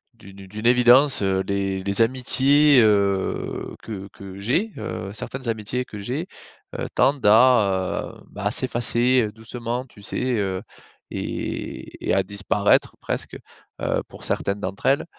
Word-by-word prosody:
d'une 100 -2 -13
d'une 105 +4 -7
évidence, 125 +2 +5
heu. 95 -1 +1
Les 95 -1 -1
les 100 +3 0
amitiés, 130 +3 +4
heu, 100 -3 0
que 100 -3 -7
que 95 0 -10
j'ai, 170 - 0
heu, 95 - -5
certaines 130 +3 -6
amitiés 115 +3 -2
que 105 - -9
j'ai, 130 - -4 0.5
heu, - - -2
tendent 140 -4 +2
à, 105 -4 +3
heu, - - -17
bah, 100 0 -7
à 105 - +2
s'effacer 120 0 +2
doucement, 115 +3 -5
tu 115 -5 -18
sais, 125 +4 -2
heu, 95 -2 -2 0.5
et - - -5
et - - -3
et - - +3
à 95 - +2
disparaître 100 +1 +1
presque, - - -3 0.4
heu, - - 0
pour - - -13
certaines 100 +1 -1
d'entre 95 0 -4
elles, 135 +1 +3
110 Hz, 150 wpm, -23 LUFS, 100-125 Hz, 0.5 s, évidence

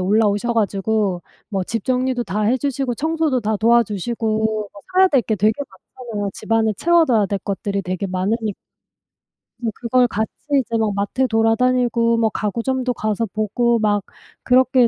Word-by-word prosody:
올라오셔 205 +3 +2
가지고 205 -3 0 0.3
뭐 195 -3 -1
집 230 +3 -4
정리도 255 -1 0
다 210 +2 -2
해 240 +5 +3
주시고 270 -2 -2
청소도 315 -4 0
다 215 0 -1
도와주시고 220 0 +1 0.3
뭐 200 - -13
사야 375 +1 +6
될 275 -7 +3
게 220 -1 -1
되게 215 +2 +3 0.4
많잖아요. 215 -5 -4
집 - - -11
안에 225 -1 +3
채워둬야 315 -12 +3
될 200 +1 -2
것들이 200 0 -3
되게 185 +2 -3
많으니 205 +3 -1 1.1
이제 230 -3 -2
그걸 245 +1 +2
같이 220 0 -2 0.3
이제 230 -2 -2
막 220 -2 0
마트에 200 +6 0
돌아다니고 230 +1 +2
뭐 225 -1 +2
가구점도 245 +5 -2
가서 215 0 -1
보고 220 +3 0
막 205 -2 +1 0.4
그렇게 255 -1 +4
225 Hz, 335 characters per minute, -20 LUFS, 205-250 Hz, 1.1 s, 사야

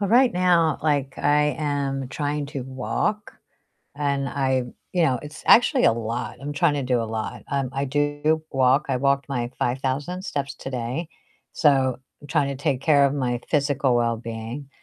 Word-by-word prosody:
Well, 200 - 0
right 250 0 +5
now, 175 -3 +3
like, 145 -3 0
I 150 -1 +2
am 140 -3 -1
trying 145 +1 -2
to 140 -1 -5
walk 130 +11 -2 0.6
and 140 -1 -1
I 130 -1 0 0.3
you 175 - +3
know, 130 -6 +2
it's 150 +1 -10
actually 250 +2 +6
a - - +6
lot, 115 +1 -4
I'm 145 +1 -5
trying 150 0 +2
to 145 - -1
do 125 -2 +1
a - - -1
lot. 110 0 -4
Um, 135 -3 -1
I 135 +1 -1
do 145 +3 0
walk, 135 +1 +3
I 130 - +2
walked 140 +1 +1
my 120 -3 -2
5,000 135 +8 -1
steps 140 -7 -3
today, 130 +4 -4 0.5
so 135 -5 +3 0.2
I'm 145 - -12
trying 145 -1 +1
to 140 - -3
take 135 -4 0
care 140 -2 +5
of 140 - -1
my 125 -4 -1
physical 140 -3 +1
wellbeing. 115 +3 -3
140 Hz, 175 wpm, -24 LUFS, 130-150 Hz, 0.6 s, actually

